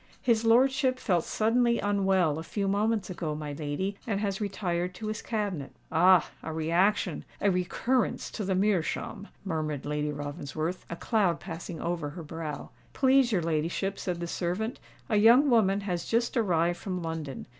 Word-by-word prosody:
"His 230 -2 +3
lordship 260 +3 +4
felt 180 -9 +1
suddenly 235 +2 +2
unwell 190 -6 +2
a - - -5
few 200 +3 -2
moments 205 0 0
ago, 160 -4 -3
my 150 -1 -5
lady, 155 +7 -3
and 200 -3 0
has 200 -1 -2
retired 180 -3 -2
to 215 - -7
his 215 0 -4
cabinet." 200 - -3 0.2
"Ah! 180 +1 +5
a 160 - -5
reaction—a 175 +5 +1
recurrence 205 +8 0
to 215 - -4
the 190 -1 0
meerschaum!" 195 +1 0 0.2
murmured 155 -5 -2
Lady 150 0 -1
Ravensworth, 145 +4 -4
a 170 - -4
cloud 190 -3 +1
passing 165 0 -7
over 170 -4 -2
her 170 +3 -8
brow. 155 -1 -6 0.2
"Please 265 -2 +4
your 185 -6 +1
ladyship," 165 +5 -1
said 180 -2 -3
the 170 - -3
servant, 180 +7 -2 0.3
"a - - +2
young 240 +7 +6
woman 205 -4 +3
has 180 -4 -2
just 235 +2 0
arrived 175 -6 +1
from 185 -3 -4
London. 160 -4 -5
185 Hz, 160 wpm, -28 LUFS, 165-215 Hz, 0.3 s, young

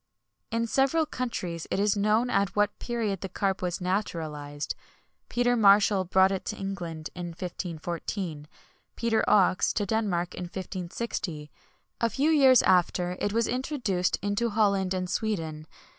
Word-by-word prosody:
[XXI - - -8
139] 230 - +1
In - - -2
several 275 +7 +2
countries 185 - -4
it - - -1
is 205 0 +2
known 215 +4 +2
at 200 -1 +1
what 205 0 +1
period 225 -6 -2
the 195 - -4
carp 195 +1 -1
was 180 -1 -2
naturalized. 155 -6 -3 0.6
Peter 245 0 +2
Marshall 200 -2 +5
brought 190 +2 +4
it 195 - -2
to 215 - -3
England 175 -6 -5
in 175 -1 -5
1514; 170 -1 -5 0.5
Peter 230 -1 +1
Oxe 185 -2 +4
to 205 - 0
Denmark 185 -5 -1
in 180 - -5
1560. 180 -3 -5 0.5
A 230 - +3
few 280 +8 +1
years 265 -5 +6
after, 180 0 +2
it 205 - 0
was 230 +1 +1
introduced 245 -8 -1
into 205 +3 0
Holland 200 -3 +2
and 185 0 -2
Sweden. 165 -7 -3
195 Hz, 150 wpm, -27 LUFS, 175-220 Hz, 0.6 s, years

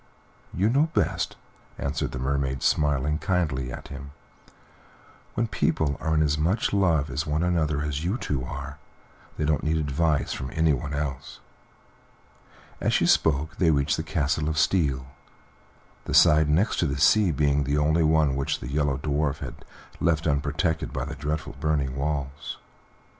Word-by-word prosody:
"You 95 +4 +1
know 140 +7 +3
best," - - 0 0.4
answered 70 +2 -2
the - - -5
Mermaid, 65 0 -1
smiling 75 +1 +1
kindly 75 -10 -1
at - - -8
him. 70 0 -9 1.2
"When 115 - +1
people 80 -8 0
are 80 -1 0
as 75 0 0
much 90 +10 +1
in 100 - +3
love 80 -6 +2
with 75 +2 -2
one 75 +2 0
another 80 -4 +1
as 75 0 -3
you 95 +7 0
two 70 - -2
are, 70 +2 -7 0.6
they 75 - -1
don't 75 -2 +1
need 80 +1 0
advice 75 0 0
from 65 - -5
anyone 75 -3 +1
else." 70 -3 -4 1.4
As - - +1
she - - +3
spoke 75 0 +2
they 85 - +3
reached 70 -1 +2
the - - -2
Castle 75 -1 -1
of 80 - -2
Steel, 70 -10 +1 1.0
the - - -2
side 75 0 +6
next 90 +9 +2
the 70 -1 0
sea 100 +6 +5
being 70 -1 +1
the 70 +2 0
only 80 +3 +2
one 80 -3 +3
which 70 +3 -1
the 60 - -7
Yellow 75 -2 +1
Dwarf 75 0 -1
had - - -8 0.4
left 85 -1 +1
unprotected 75 +3 0
by 65 0 -3
the 70 - -6
dreadful 75 +2 -4
burning 70 -4 0
walls. 70 0 -3
75 Hz, 160 wpm, -26 LUFS, 70-80 Hz, 1.4 s, side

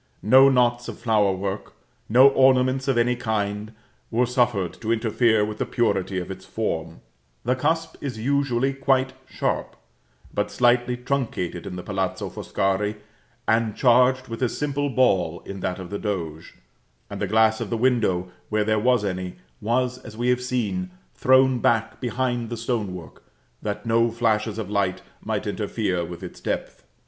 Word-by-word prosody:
No 130 +5 +7
knots 120 -2 +2
of - - -6
flowerwork, 100 -3 0 0.4
no 130 +5 +8
ornaments 130 0 +3
of 135 -3 +2
any 120 +1 +3
kind, 105 -2 -2 0.4
were 120 +2 +2
suffered 120 -7 +1
to 115 0 -1
interfere 110 -1 +2
with 105 0 -6
the - - 0
purity 100 -5 0
of 90 +1 -4
its 95 0 -8
form: 85 -5 -4 0.4
the 125 +2 +2
cusp 160 +5 -1
is 130 -5 -4
usually 135 +1 +1
quite 135 -1 +1 0.2
sharp; - - -2 0.6
but 105 0 -1
slightly 125 0 +2
truncated 120 - -3
in - - -6
the 90 - -6
Palazzo 95 -2 -3
Foscari, 100 +2 -1 0.5
and 110 0 +2
charged 130 +1 +4
with 115 +1 -6
a 125 - +2
simple 145 +1 -2
ball 95 -11 +1
in 100 0 -7
that 90 0 -2
of 95 -1 -8
the 100 - -3
Doge; 85 -7 -4 0.5
and 100 - -7
the 100 - 0
glass 110 +2 +3
of - - -3
the 115 - -1
window, 110 -8 +1 0.2
where 110 -1 +1
there 110 0 +1
was 120 -1 +2
any, 90 -2 -3 0.3
was, 125 +3 0
as 110 -3 -11
we 120 +1 0
have 125 0 +2
seen, 105 -8 -2 0.2
thrown 130 0 +4
back 115 -1 +1
behind 120 -1 -1
the 120 - -4
stone 110 -5 -2
work, 85 -3 -11 0.4
that 105 +2 -4
no 115 +1 +3
flashes 110 -2 0
of 110 -4 -4
light 100 -2 -1 0.2
might - - -2
interfere 90 -2 -1
with 85 0 -8
its - - -8
depth. - - -4
115 Hz, 165 wpm, -24 LUFS, 100-125 Hz, 0.6 s, no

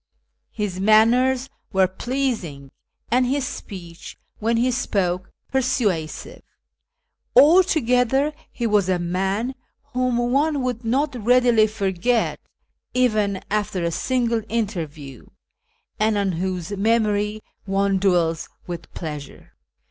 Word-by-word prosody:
His 200 -4 -4
manners 245 +6 +4 0.2
were 190 -2 +4
pleasing, 190 - -3 0.4
and 250 +2 +4
his 270 +1 0
speech, 170 -8 -8 0.2
when 230 +2 +1
he 250 +2 +2
spoke, 185 -7 -1 0.2
persuasive. 225 - -1 0.9
Altogether 285 -4 +4 0.2
he 240 - -4
M 220 - -1
as 200 -3 +3
a 185 - +2
man 190 +8 -1 0.4
whom 250 -1 +1
one 275 +4 +1
would 250 -2 -2
not 270 +6 0
readily 240 -2 +4
forget, 210 +2 0 0.6
even 215 -6 +1
after 210 -3 -1
a 170 - 0
single 235 +3 0
interview, 160 - -4 0.7
and 215 0 +2
on 200 -2 +1
M'hose 185 +1 -3
memory 210 0 +1 0.2
one 195 0 +1
dM'ells 170 -4 +1 0.2
with 175 -2 -7
pleasure. 150 -4 -8
215 Hz, 110 wpm, -22 LUFS, 185-250 Hz, 0.9 s, manners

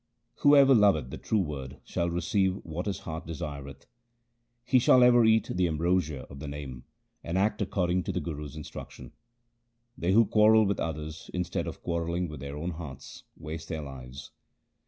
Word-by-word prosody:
Whoever 140 -1 +6
loveth 100 - +3
the - - -7
true 110 -2 +1
Word 70 -4 -6
shall 85 0 -1
receive 95 +2 +1
what 85 +4 -5
his 100 -4 -3
heart 80 -1 -6
desireth. 70 -4 -7 0.8
He 130 +1 +4
shall 125 0 +6
ever 120 -1 +6
eat 110 -1 +3
the 90 0 +2
ambrosia 80 -3 0
of 70 +2 -11
the 75 - -7
Name, 70 -3 -7 0.4
and 85 +2 -2
act 105 +2 +1
according 90 -2 0
to - - -1
the 90 - -2
Guru's 75 -4 -6
instruction. 65 -4 -9 0.8
They 90 +2 0
who 115 +2 +6
quarrel 110 +1 +5
with 100 0 -1
others, 80 0 -5
instead 90 -1 -2
of - - -7
quarrelling 85 +1 -1
with 75 -2 -8
their 70 +2 -6
own 85 +4 -3
hearts, 75 -5 -9
waste 80 +1 -7
their 80 -2 -3
lives. 65 -1 -9
85 Hz, 170 wpm, -28 LUFS, 75-95 Hz, 0.8 s, Whoever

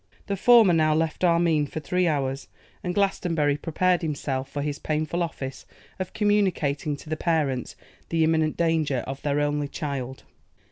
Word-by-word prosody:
The 200 - -2
former 225 -2 +6
now 155 -1 +3
left 160 +2 -1
Armine 170 -4 +3
for 155 - -5
three 180 +3 0
hours, 135 -3 -1 0.4
and 180 -1 -3
Glastonbury 170 -7 +1
prepared 180 +4 +1
himself 140 -4 -3
for 145 0 -3
his 145 -1 -3
painful 155 +3 -2
office 135 -6 -4 0.4
of 185 -1 -4
communicating 185 -9 +1
to 140 - -14
the 155 - -1
parents 155 -7 -1 0.3
the 165 -1 +2
imminent 160 -1 +1
danger 160 -6 +1
of 135 0 -6
their 145 0 0
only 145 0 0
child. 135 -4 -5
155 Hz, 155 wpm, -25 LUFS, 145-170 Hz, 0.4 s, former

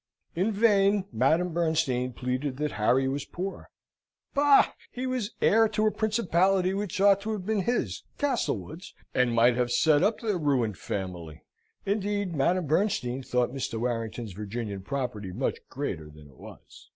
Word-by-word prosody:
In 190 +6 +1
vain 200 -2 +3
Madame 160 +9 +2
Bernstein 155 -7 0
pleaded 130 +2 -3
that 150 0 -1
Harry 125 +5 +2
was 135 +2 -2
poor. 190 +2 -6 0.6
Bah! 285 -1 +5 0.2
he 255 +1 -4
was 255 -5 -3
heir 225 +1 +5
to 215 0 0
a 215 - +3
principality 190 -4 +1
which 195 -2 -3
ought 200 0 +5
to 220 +2 -3
have 195 -4 -5
been 215 -1 0
his, 240 +5 -1 0.2
Castlewood's, 180 - -2 0.2
and 125 -1 +2
might 120 +1 +5
have 125 0 0
set 150 +3 +4
up 215 +2 +2
their 210 -6 -1
ruined 125 - 0
family. 90 -5 -5 0.4
(Indeed 205 -2 -1
Madame 170 +5 +1
Bernstein 140 - 0
thought 125 -1 0
Mr. 125 -4 -3
Warrington's 115 -2 -3
Virginian 105 0 -5
property 120 -5 -4
much - - -2
greater 80 -1 -4
than 75 0 -15
it 65 - -20
was.) - - -14
155 Hz, 155 wpm, -27 LUFS, 120-200 Hz, 0.6 s, Bah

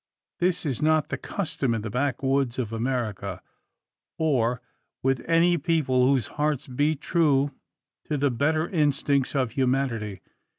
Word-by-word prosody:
This 180 -1 +1
is 135 -6 -1
not 155 0 +2
the - - -2
custom 140 - -2
in 110 - -3
the 110 - -4
backwoods 135 0 0
of 115 -4 -3
America, 110 -6 -2 0.8
or 125 -6 +1 0.4
with 135 -1 +1
any 170 +1 +4
people 140 -5 +2
whose 135 -4 +2 0.2
hearts 150 -3 0
beat 145 +3 0
true 145 -5 +2 0.5
to 150 - -1
the 140 -1 +1
better 155 +6 +1
instincts 145 -4 +1
of 130 -4 +1
humanity. 125 -6 -1
135 Hz, 135 wpm, -26 LUFS, 125-150 Hz, 0.8 s, any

